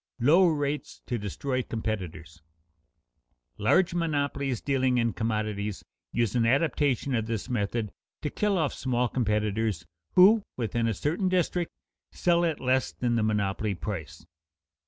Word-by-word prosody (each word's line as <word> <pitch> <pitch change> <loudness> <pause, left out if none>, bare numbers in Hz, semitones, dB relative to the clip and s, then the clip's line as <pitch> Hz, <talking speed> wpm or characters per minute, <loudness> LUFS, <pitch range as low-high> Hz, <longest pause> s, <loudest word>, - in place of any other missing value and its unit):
[Sidenote: 135 +5 +4
Low 185 0 +6
rates 145 -2 -2
to 120 -2 -2
destroy 130 +6 -2
competitors] 95 -9 -5 1.2
Large 175 - +3
monopolies 140 -6 -1
dealing 130 -2 +1
in 115 -1 +1
commodities 105 -2 -2 0.3
use 115 -4 0
an 120 -2 +2
adaptation 140 +1 +1
of 115 -2 0
this 115 +1 -3
method 110 -1 -1 0.3
to 150 - -2
kill 205 -2 +1
off 155 -5 0
small 125 -1 0
competitors 105 -5 0 0.3
who, 205 +5 +7 0.2
within 115 -1 0
a 115 - 0
certain 170 - 0
district, 180 -1 0 0.4
sell 175 -1 +2
at 160 -3 -1
less 130 0 +1
than 120 -1 -1
the 115 - +2
monopoly 105 -1 0
price. 85 -3 -6
120 Hz, 135 wpm, -28 LUFS, 105-145 Hz, 1.2 s, who